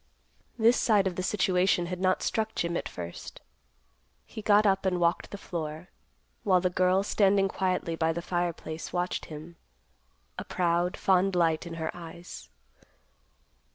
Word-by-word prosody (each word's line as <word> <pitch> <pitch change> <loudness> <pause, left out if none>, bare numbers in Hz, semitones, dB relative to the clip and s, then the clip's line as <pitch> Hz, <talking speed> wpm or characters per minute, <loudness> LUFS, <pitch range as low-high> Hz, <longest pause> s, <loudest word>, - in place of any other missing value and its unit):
This 235 +2 +4
side 210 -4 +3
of 185 -2 -1
the 185 - -2
situation 185 -2 +2
had 180 +1 -5
not 185 0 +1
struck 220 0 -1
Jim 170 0 -1
at - - -3
first. 85 -1 -8 0.9
He 220 - -8
got 210 0 +4
up 195 -1 +3
and 185 -2 0
walked 170 0 +1
the 200 - -7
floor, 160 -1 -6 0.5
while 185 -3 +3
the 180 0 0
girl, 185 +2 +2
standing 195 -1 +3
quietly 185 -3 -1
by 165 0 +1
the 170 +1 -4
fireplace, 170 -2 -3
watched 180 0 -2
him, 160 +2 -10 0.8
a - - -4
proud, 175 0 0
fond 190 0 +2
light 165 -1 +1
in 165 - -6
her 160 -1 -4
eyes. 170 - -10
180 Hz, 155 wpm, -28 LUFS, 170-195 Hz, 0.9 s, This